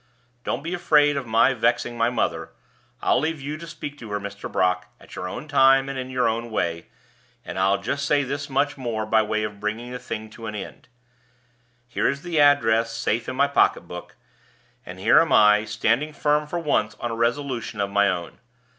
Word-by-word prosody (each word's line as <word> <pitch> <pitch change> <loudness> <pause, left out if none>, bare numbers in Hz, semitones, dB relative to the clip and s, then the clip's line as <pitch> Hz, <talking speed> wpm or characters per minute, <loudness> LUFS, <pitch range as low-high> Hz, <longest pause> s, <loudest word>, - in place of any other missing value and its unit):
"Don't - - -3
be 170 +2 -4
afraid 150 -4 +3
of 135 -3 -3
my 115 +4 +4
vexing 120 0 0
my 115 0 +2
mother; 80 -9 -2 0.5
I'll - - +3
leave 155 +2 -2
you 145 +2 -5
to 170 +1 -10
speak 150 -3 -8
to 115 - -9
her, 105 0 -2
Mr. 100 0 -7
Brock, 90 0 +1
at - - -16
your 90 - -4
own 150 - -7
time 135 -1 +5
and 135 -1 -4
in 130 0 -5
your 125 -2 +1
own 115 +1 -2
way; 85 -6 -2 0.6
and - - -5
I'll 95 +1 +3
just 140 +8 -3
say 145 -1 +3
this 140 +2 -4
much 140 +1 0
more 115 -4 -2
by 110 +1 +3
way 110 0 -1
of 105 -1 -5
bringing 110 +4 -4
the 125 - -5
thing 110 -3 -6
to 115 0 -9
an 105 - -5
end. 105 - -8 1.0
Here 120 - 0
is 140 +1 -4
the 170 -3 -1
address 115 -6 +4
safe 115 0 -1
in 130 - -4
my 140 +2 +3
pocket 140 - +3
book, 90 0 -10 0.7
and - - -8
here - - +5
am - - +1
I, 105 0 +5
standing 115 +8 0
firm 150 +1 +1
for 175 - -3
once 145 -10 0
on 120 - -3
a - - -3
resolution 120 -2 -2
of 100 0 -1
my 100 0 +3
own. 85 -2 -4
120 Hz, 210 wpm, -24 LUFS, 105-140 Hz, 1.0 s, time